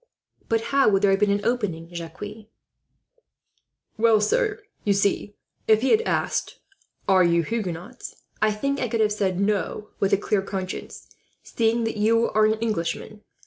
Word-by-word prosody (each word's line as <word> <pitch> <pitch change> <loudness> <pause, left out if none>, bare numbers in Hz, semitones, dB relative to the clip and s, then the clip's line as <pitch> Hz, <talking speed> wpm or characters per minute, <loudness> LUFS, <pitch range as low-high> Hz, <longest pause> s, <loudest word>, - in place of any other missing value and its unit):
"But 225 0 +2
how 275 -5 +5
would 195 -1 +2
there 200 - +5
have 195 - +2
been 210 0 +3
an 200 0 0
opening, 200 -9 -1
Jacques?" 165 0 -7 1.8
"Well, 225 -1 +5
sir, 430 - 0 0.2
you 205 - +2
see, 200 +1 0 0.3
if 220 0 +5
he 265 - +2
had 445 - +5
asked, - - -1 0.5
'Are 190 -1 +5
you 170 -1 +3
Huguenots?' 180 -4 -5 0.3
I 215 0 +4
think 275 +7 -2
I 245 - 0
could 225 0 0
have 210 -1 +3
said 190 -3 -1
'No,' 210 +1 -1
with 195 - +1
a - - +5
clear 205 0 0
conscience, 190 -1 -6 0.4
seeing 230 0 0
that 225 -1 -2
you 230 +2 +2
are 215 0 +4
an 215 - +2
Englishman. 215 -1 -3
210 Hz, 165 wpm, -24 LUFS, 195-225 Hz, 1.8 s, how